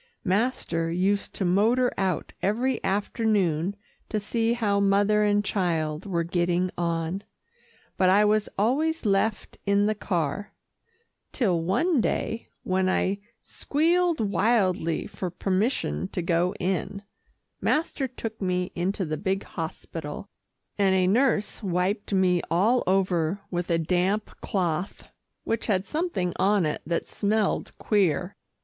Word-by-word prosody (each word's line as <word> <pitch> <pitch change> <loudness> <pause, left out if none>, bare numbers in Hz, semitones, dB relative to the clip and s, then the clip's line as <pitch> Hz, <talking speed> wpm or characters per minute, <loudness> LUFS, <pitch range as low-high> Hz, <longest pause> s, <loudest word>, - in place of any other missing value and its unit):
Master 185 -5 0
used 195 +4 0
to 195 - -1
motor 225 +8 +3
out 190 -2 -1
every 240 +5 0
afternoon 200 -4 0 0.3
to 215 - 0
see 225 +2 0
how 210 -4 +1
mother 200 +1 +3
and 205 0 +2
child 165 -4 -1
were 170 -3 0
getting 175 +1 0
on, 170 +2 -2 0.7
but 185 - +4
I 205 +3 +5
was 210 0 +2
always 290 +9 +1
left 205 +1 0
in 200 0 +3
the 215 - +2
car, 180 -3 -2 0.8
till 185 - +1
one 260 - +2
day, 225 +1 -2 0.2
when 185 0 +1
I 195 +1 +1 0.2
squealed 340 +3 +1
wildly 195 -5 +1
for 185 - -5
permission 185 - -1
to 180 - -2
go 175 +3 +1
in, 195 +2 -2 0.6
master 300 -3 0
took 225 -3 -7
me 180 -1 -1
into 185 +2 -1
the 155 -1 -3
big 190 +3 -1
hospital, 160 +1 -6 0.5
and 195 -1 +4
a 185 -1 +3
nurse 220 +2 +2
wiped 190 +2 -1
me 185 -2 +3
all 215 +9 +3
over 185 -1 +1
with 175 -1 -2
a 170 - +3
damp 180 +5 0
cloth 180 -2 -2 0.3
which 225 - -2
had 195 -3 +1
something 305 - -1
on 195 -2 +3
it 150 - -2
that 170 0 -1
smelled 210 0 0
queer. 185 -3 +1
195 Hz, 130 wpm, -26 LUFS, 180-215 Hz, 0.8 s, I